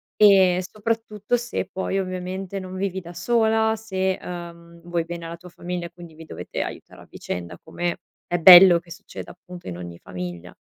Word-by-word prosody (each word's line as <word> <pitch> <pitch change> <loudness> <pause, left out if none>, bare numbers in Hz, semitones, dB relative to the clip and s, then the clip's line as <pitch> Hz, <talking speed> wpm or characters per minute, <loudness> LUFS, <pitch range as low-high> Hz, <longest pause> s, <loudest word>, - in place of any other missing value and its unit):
E 190 -3 +6
soprattutto 215 +2 -2
se 240 +1 -4
poi 190 +1 -2
ovviamente 185 +1 -4
non 185 0 -8
vivi 190 0 -2
da 175 +1 -11
sola, 220 +3 +2
se, 190 -4 -1
ehm, 170 -1 -9
vuoi 170 -1 -2
bene 170 0 -7
alla 170 +1 -7
tua 180 +1 -13
famiglia, 175 0 -5
quindi 170 -2 -13
vi 160 +1 -12
dovete - - -6
aiutare - - -8
a - - -16
vicenda, 85 -1 -6
come 175 0 -3 0.3
è 175 - 0
bello 175 0 +10
che 170 - -21
succeda 205 +4 -9
appunto 180 0 -12
in 85 - -5
ogni 85 -1 -8
famiglia. 90 -1 -7
180 Hz, 175 wpm, -23 LUFS, 170-195 Hz, 0.3 s, bello